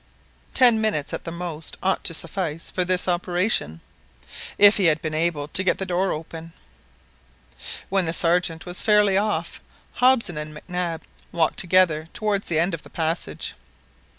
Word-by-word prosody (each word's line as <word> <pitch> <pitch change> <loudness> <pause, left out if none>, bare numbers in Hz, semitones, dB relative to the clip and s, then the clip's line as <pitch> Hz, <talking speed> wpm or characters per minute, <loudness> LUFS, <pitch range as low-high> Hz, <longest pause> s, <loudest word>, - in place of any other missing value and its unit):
Ten 240 -4 +5
minutes 210 -10 -1
at - - -5
the 165 - -5
most 170 -2 -5
ought 190 0 0
to 165 - +3
suffice 165 -1 -4
for 185 - 0
this 180 +1 +1
operation, 175 - 0 0.8
if 205 0 +7
he 195 - +1
had 155 -2 +3
been 155 0 -5
able 155 -2 -1
to 185 - +1
get 190 - +1
the 190 - -4
door 185 +1 0
open. 165 +1 -7 1.4
When 190 -3 +1
the - - 0
Sergeant 170 -1 +1
was 175 0 -1
fairly 210 -3 +3
off, 210 +2 -1 0.3
Hobson 245 -10 +2
and 150 0 -7
Mac - - -13
Nab 180 -2 -3 0.3
walked 165 -2 0
together 175 -4 +2
towards 210 -3 -1
the 165 - 0
end 170 +3 +1
of 165 - -5
the - - -16
passage. 165 +1 -2
175 Hz, 165 wpm, -23 LUFS, 160-190 Hz, 1.4 s, if